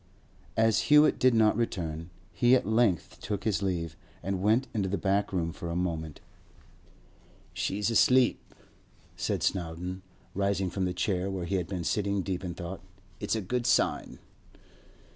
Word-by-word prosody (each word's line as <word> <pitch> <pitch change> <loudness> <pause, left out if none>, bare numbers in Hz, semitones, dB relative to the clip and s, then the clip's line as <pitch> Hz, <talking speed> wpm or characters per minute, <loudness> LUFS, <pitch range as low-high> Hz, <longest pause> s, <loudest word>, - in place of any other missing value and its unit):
As 110 -1 +2
Hewett 150 +1 +6
did 130 -2 +4
not 110 -1 +4
return, 85 -8 -3 0.2
he 120 +8 +4
at 130 - +1
length 110 -4 +1
took 100 -1 -3
his 105 -3 0
leave, 85 -5 -2 0.3
and 95 -1 -2
went 110 +7 +3
into 100 -4 -1
the 100 - 0
back 100 +1 0
room 85 -3 -1
for 85 - -6
a 85 - -3
moment. 80 -4 -3 1.3
'She's 105 +3 -1
asleep,' 125 +2 +3 0.6
said - - -2
Snowdon, 90 +1 -2 0.3
rising 100 -2 0
from 95 -1 -1
the 90 - -1
chair 95 0 0
where 95 -2 -3
he 95 +2 0
had 90 -3 -2
been 90 -3 -4
sitting 100 +2 0
deep 95 0 -3
in 90 -2 -4
thought. 90 +2 -6 0.4
'It's - - -1
a 110 - -1
good 120 +5 -2
sign. - - +1
95 Hz, 160 wpm, -29 LUFS, 90-110 Hz, 1.3 s, Hewett